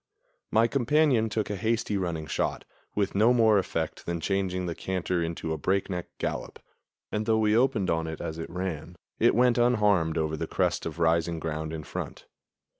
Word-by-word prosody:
My 110 +1 +4
companion 130 -2 +2
took 105 -1 -2
a - - -1
hasty, 110 +1 0
running 85 -5 -2
shot, - - -2 0.3
with 100 -1 0
no 110 +5 +5
more 110 -3 +5
effect 95 - -3
than 85 -1 -1
changing 90 0 -1
the 85 - -2
canter 90 0 -2
into 80 -1 -3
a 80 - -4
breakneck 95 +1 -1
gallop; - - -4 0.5
and, 105 +1 -2
though 110 -1 +4
we 110 -1 +3
opened 120 -6 +2
on 80 0 0
it 80 -1 -5
as 80 0 -5
it 80 - -5
ran, 90 -2 -4 0.2
it - - +4
went 125 0 +4
unharmed 105 -9 +3
over 80 0 0
the - - -4
crest - - 0
of 80 -1 -6
rising 85 0 +2
ground 80 0 -3
in 80 -1 -5
front. - - -6
95 Hz, 185 wpm, -27 LUFS, 80-110 Hz, 0.5 s, no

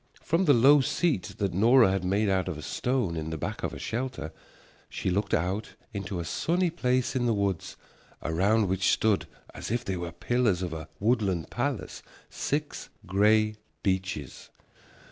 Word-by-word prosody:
From 170 +4 +1
the 145 - +6
low 140 +5 +7
seat 125 - 0
that 100 -3 -1
Nora 115 +3 +5
had 95 -1 -1
made 100 +4 +1
out 95 -1 +1
of 90 -4 -3
a 75 - -8
stone 125 -9 -1
in 80 0 -3
the 80 - -4
back - - -4
of - - -2
her - - -7
shelter 115 - -4 0.6
she 95 - -2
looked 100 +3 -1
out 95 +6 -2 0.2
into 100 -2 -4
a 85 - -4
sunny 175 - 0
place 130 -5 0
in 120 -2 +1
the 115 - +2
woods, 100 -4 -2 0.5
around 100 +6 +2
which 95 0 +1
stood, 110 -3 +2 0.3
as - - -6
if 120 +2 -1
they 95 -1 -2
were 85 -1 -4
pillars 105 -1 0
of 85 -3 -3
a 80 -1 -6
woodland 100 - 0
palace, - - -3 0.3
six 145 +1 -3 0.2
gray 105 +3 +3 0.3
beeches. 95 -7 -2
100 Hz, 170 wpm, -28 LUFS, 90-120 Hz, 0.6 s, low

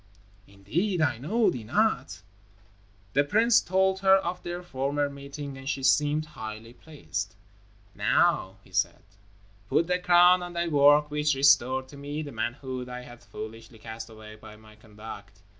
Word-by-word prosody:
"Indeed! 160 - -2
I 140 -7 +1
know 215 - +1
thee 120 -3 -6
not." 125 - 0 0.9
The 145 - +4
prince 220 +10 +4
told 190 +1 +1
her 190 0 +6
of 180 -1 -2
their 175 +1 -6
former 140 -2 -2
meeting 140 0 -8
and 135 +1 -6
she 135 -3 -3
seemed 150 +3 +2
highly 110 0 -8
pleased. 105 - -6 0.6
"Now," - - +1
he - - -21
said, - - -1 0.7
"put 165 - +2
the 180 +1 0
crown 180 0 +5
on 175 0 -7
thy 170 0 -1
work 145 0 +5
which 150 -1 +1
restored 130 -1 +3
to 140 - -12
me 145 +2 -5
the 145 - -8
manhood 125 +2 -4
I 125 0 -6
had 120 -1 -13
foolishly 115 +1 -10
cast 110 +1 -8
away 110 -1 -12
by 105 0 -13
my 110 0 -17
conduct. 105 -2 -12
140 Hz, 160 wpm, -27 LUFS, 115-170 Hz, 0.9 s, her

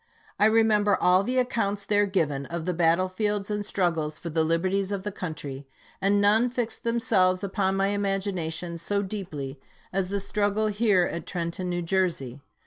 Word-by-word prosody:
I 205 - +5
remember 220 -2 +3
all 180 +1 +4
the 250 +6 -1
accounts 205 -5 0
there 205 -1 +2
given 150 -8 -1
of 170 -1 -4
the 180 - 0
battle 170 +2 +3
fields 205 +1 -2
and 210 0 -1
struggles 165 -6 -1
for 170 - -6
the 160 +1 +2
liberties 185 +5 0
of 195 -2 -3
the 210 - -3
country, 145 -7 -6 0.3
and 200 +1 +3
none 215 +4 +4
fixed 240 -2 -3
themselves 205 -6 +2
upon 195 -1 0
my 195 0 +1
imagination 190 -4 -2
so 200 +4 -1
deeply 155 -9 -5 0.3
as 190 -1 0
the 200 +1 -1
struggle 205 +2 0
here 205 -3 +3
at 170 -2 -4
Trenton, 175 0 -3
New 175 0 -2
Jersey. 165 -8 -1
190 Hz, 170 wpm, -26 LUFS, 170-205 Hz, 0.3 s, I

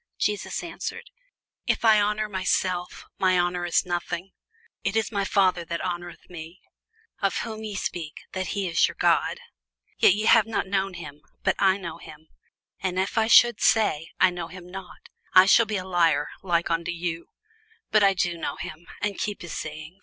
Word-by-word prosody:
Jesus 210 -1 -1
answered, 345 - -6 0.6
If - - +1
I 215 -2 +6
honour 210 +1 0
myself, 185 -2 -1
my 185 -1 +3
honour 175 0 0
is 170 - +2
nothing: 175 +1 -3 0.5
it 200 - -1
is 225 -1 +1
my 200 -2 0
Father 185 -3 +2
that 170 0 -3
honoureth 175 -1 -5
me; 170 +1 -10 0.6
of - - +1
whom 220 -1 -6
ye 210 -2 -5
say, 170 -4 -3 0.2
that 185 -1 -3
he 195 +2 -2
is 165 - +3
your - - -8
God: - - +2 0.6
yet 190 - +6
ye 215 +1 -2
have 225 -1 +6
not 225 - -1
known 190 -1 -1
him; 150 -4 -9 0.2
but - - +2
I 190 0 +4
know 170 -4 -7
him: 155 +1 -13 0.5
and 185 -1 -2
if 190 +1 -1
I 220 -1 +3
should 240 -1 +6
say, 210 -8 +3
I 185 - +5
know 175 -2 -5
him 180 0 -11
not, 190 0 -10 0.3
I 185 0 +9
shall 230 +3 +5
be 215 -1 -1
a 185 - -5
liar 165 -5 +2
like 170 -2 0
unto 165 +1 -1
you: 170 -1 -4 0.6
but 215 -1 +5
I 195 -1 +5
know 170 -2 -4
him, 170 0 -8 0.2
and 205 -2 -1
keep 205 -3 -3
his 170 - -7
saying. 155 +4 -7
185 Hz, 185 wpm, -25 LUFS, 170-200 Hz, 0.6 s, I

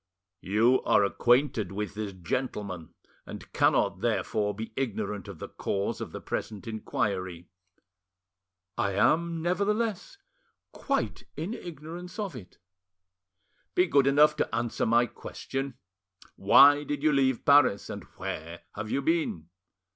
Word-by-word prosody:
"You 115 +7 +3
are 105 - +3
acquainted 120 -1 +2
with 105 +1 -4
this 105 -1 -4
gentleman, 95 -2 -4 0.3
and - - -10
cannot - - +2
therefore 105 -1 0
be 110 +1 -7
ignorant 105 -6 -3
of 100 -4 -8
the - - -7
cause 100 0 -3
of - - -5
the - - -6
present 105 0 -5
inquiry." 95 -5 -3 1.3
"I 100 - +1
am, 160 - +2
nevertheless, 205 - -1 0.5
quite - - -2
in 170 +8 -3
ignorance 175 0 -8
of 205 -8 -4
it." 105 -7 -11 1.2
"Be 180 - +5
good 140 -6 +3
enough 150 +2 +5
to - - -1
answer 120 -1 -1
my 120 +2 +4
question. 135 +3 -6 0.6
Why 145 +9 +7
did 145 -1 -4
you 155 - +4
leave 130 -3 +1
Paris? 140 -8 +5
And - - -6
where 85 +2 -6
have 110 +1 -5
you 140 - -1
been?" 150 - -1
120 Hz, 130 wpm, -28 LUFS, 100-150 Hz, 1.3 s, Why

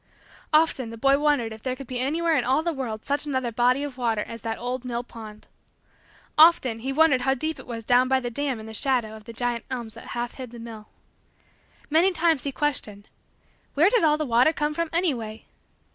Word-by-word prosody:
Often, 305 -6 +2
the 230 - -8
boy 275 +4 +3
wondered 290 -7 +1
if 220 - -12
there 255 +1 -2
could 275 +1 -9
be 250 0 -4
anywhere 320 +5 +1
in 265 - +2
all 265 +5 +1
the 340 0 -1
world 230 -6 -5
such 285 +1 -1
another 260 -4 -1
body 245 +4 +2
of 275 -3 -6
water 225 -3 0
as 230 -1 -9
that 225 -1 -3
old 250 +1 -4
mill 240 -1 -3
pond. 220 -3 -11 0.9
Often, 285 -8 +6
he 265 +4 -3
wondered 285 -3 +4
how 265 +1 +2
deep 310 +5 -3
it - - -12
was 230 -2 -6
down 250 +2 +4
by 265 0 +3
the 245 -2 -5
dam 275 -1 -1
in 220 - -9
the 220 - -9
shadow 235 -2 0
of 215 -1 -13
the - - -8
giant 240 0 -2
elms 240 -4 -5
that - - -12
half 240 0 -3
hid 255 -2 -8
the 240 - -11
mill. 225 -2 -9 1.0
Many 335 +5 +4
times, 325 -5 +1
he 280 - -1
questioned: 220 -9 -3 0.7
"Where 330 +8 +5
did 475 -6 +3
all 305 -1 +4
the 305 - -2
water 250 +5 +4
come 300 0 -1
from 335 +1 -2
anyway?" 245 -11 -2
255 Hz, 220 wpm, -25 LUFS, 230-295 Hz, 1.0 s, Often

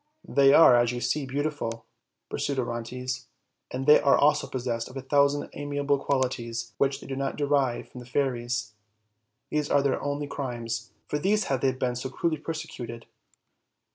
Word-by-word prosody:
"They 140 -1 +5
are, 140 -5 +8
as 120 0 +3
you 120 - -3
see, 130 +4 -1
beautiful," 140 -5 -3 0.4
pursued 140 -1 -2
Orontes, 125 +1 -3 0.4
"and 130 +1 -4
they 150 +1 +8
are 140 - +5
also 150 +1 +3
possessed 120 -3 -3
of 130 - -9
a - - -4
thousand 140 +1 +2
amiable 145 -1 -1
qualities 120 -4 -2
which 140 0 +2
they - - -10
do 135 - -4
not 135 0 -2
derive 140 -4 0
from 125 - -10
the 120 - -11
fairies; 120 -3 -1 0.8
these 150 -1 0
are 140 -1 +3
their 140 -2 +1
only 145 +1 -2
crimes; 120 -5 -4 0.2
for 150 - -1
these 205 +6 +2
have 135 -2 0
they 135 - +3
been 125 -1 -2
so 125 +2 -4
cruelly 155 +3 -1
persecuted." 120 -7 -6
135 Hz, 170 wpm, -27 LUFS, 120-145 Hz, 0.8 s, are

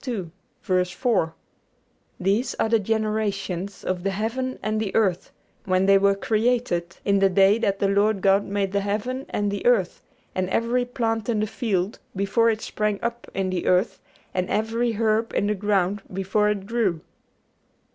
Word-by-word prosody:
4): 185 -1 0 0.8
"These 200 +7 0
are 225 - 0
the 225 0 +4
generations 205 -3 -2
of 185 -1 -2
the 195 - 0
heaven 230 +6 -2
and 215 0 0
the 205 -3 -3
earth, 190 -5 +1 0.3
when 185 0 +2
they 195 0 +6
were 200 0 +3
created, 215 -5 0
in 200 -1 +3
the 195 0 +4
day 195 +3 +4
that 200 -4 0
the 200 - +1
Lord 200 +1 +2
God 195 +1 +4
made 200 -1 -2
the 200 - +1
heaven 220 +7 -3
and 205 -1 -1
the 200 - -4
earth, 225 -7 +2 0.3
and 185 0 -1
every 235 +4 +1
plant 225 -3 -2
in 225 -3 +1
the 215 - +1
field 205 -3 -2 0.2
before 200 +4 +2
it 220 -1 -1
sprang 210 -1 -1
up 235 0 -4
in 190 -1 -1
the 180 -2 -2
earth, 185 +5 +2 0.3
and 185 0 -1
every 225 +2 0
herb 220 +1 0
in - - +2
the 210 - +1
ground 200 -1 0
before 195 +3 +1
it 200 -2 -2
grew." 205 -7 0
205 Hz, 165 wpm, -24 LUFS, 195-225 Hz, 0.8 s, they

